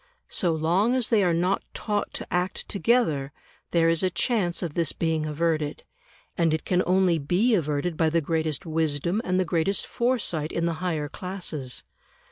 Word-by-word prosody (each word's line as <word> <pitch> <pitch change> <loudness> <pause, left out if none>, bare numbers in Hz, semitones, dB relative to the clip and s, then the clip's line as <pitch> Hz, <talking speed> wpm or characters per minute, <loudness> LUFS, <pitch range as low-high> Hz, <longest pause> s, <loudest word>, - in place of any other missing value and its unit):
So 175 - +1
long 180 +10 +2
as 255 -3 +1
they 220 -4 +4
are 180 - +3
not 180 +4 +1
taught 205 -1 -2
to - - -6
act 180 +1 -1
together, 195 - +1 0.4
there 165 -1 +3
is 165 -1 +3
a 185 - +2
chance 185 -4 0
of 165 -4 -3
this 165 0 0
being 160 -2 -1
averted, 155 -1 -1 0.5
and 165 -2 +2
it 160 - -6
can 180 -1 +2
only 180 -2 +3
be 180 - +2
averted 155 -2 0
by 160 -1 +3
the 165 +1 +2
greatest 160 0 -1
wisdom 160 +4 0
and 185 0 +1
the 185 - +2
greatest 170 +3 0
foresight 220 -11 0
in 170 - -1
the 170 - 0
higher 160 -5 -1
classes. 170 -7 -4
170 Hz, 175 wpm, -26 LUFS, 160-185 Hz, 0.5 s, they